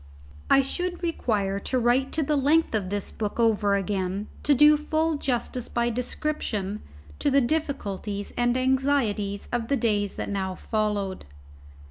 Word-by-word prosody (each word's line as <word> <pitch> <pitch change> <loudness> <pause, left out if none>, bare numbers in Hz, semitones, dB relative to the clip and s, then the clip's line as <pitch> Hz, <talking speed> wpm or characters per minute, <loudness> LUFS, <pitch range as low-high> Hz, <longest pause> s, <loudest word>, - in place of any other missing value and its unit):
I 275 - +6
should 355 +6 -3
require 205 - 0
to 255 - -2
write 250 +3 +2
to 315 - +1
the 300 +2 +1
length 295 +3 +3
of 200 -4 -1
this 205 0 -3
book 210 +1 -4
over 210 -3 +3
again 195 0 -2
to 290 - +3
do 295 +3 +7
full 310 +1 0
justice 250 -2 -2
by 240 0 0
description 225 -5 -2 0.4
to - - +2
the 280 0 +4
difficulties 215 -8 -2
and 240 +1 +2
anxieties 255 -6 0
of 240 -2 -1
the 280 - +1
days 205 -4 0
that - - -4
now 190 -2 -2
followed. 210 -3 -2
235 Hz, 150 wpm, -26 LUFS, 205-280 Hz, 0.4 s, do